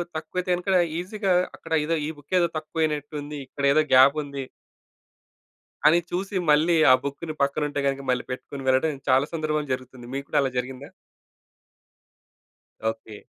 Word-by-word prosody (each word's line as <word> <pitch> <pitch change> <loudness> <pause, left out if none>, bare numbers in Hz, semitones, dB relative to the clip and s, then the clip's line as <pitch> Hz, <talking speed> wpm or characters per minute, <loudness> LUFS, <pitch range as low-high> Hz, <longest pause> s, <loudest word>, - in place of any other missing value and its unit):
తక్కువైతే 180 +3 -4
గనక 185 +1 +1 0.2
ఈజీగా 195 +1 -1 0.2
అక్కడ - - -7
ఏదో 165 +2 0
ఈ - - -3
బు‌క్కేదో 170 +5 +1
తక్కువనట్టుంది, 150 -2 -3
ఇక్కడేదో 140 +3 +2
గ్యాపుంది... 140 +1 +4 1.4
అని 170 +3 +6
చూసి 195 +3 -3
మళ్ళీ, 155 +3 +4 0.2
ఆ - - +9
బుక్కుని 145 +3 -5
పక్కన 140 +2 +1
ఉంటే 145 0 -3
గనుక 135 0 -1
మళ్ళీ 125 -1 +1
పెట్టుకొని 135 +1 -7
వెళ్ళడం, 135 +2 +2
చాలా 130 +2 +4
సందర్భంలో 155 -2 -1
జరుగుతుంది. 130 -1 -7
మీకు 140 - -4
కూడా - - +2
అలా 135 - +1
జరిగిందా? 130 +2 -4 2.0
ఓకే. 110 -1 -8
145 Hz, 130 wpm, -25 LUFS, 135-160 Hz, 2.0 s, ఆ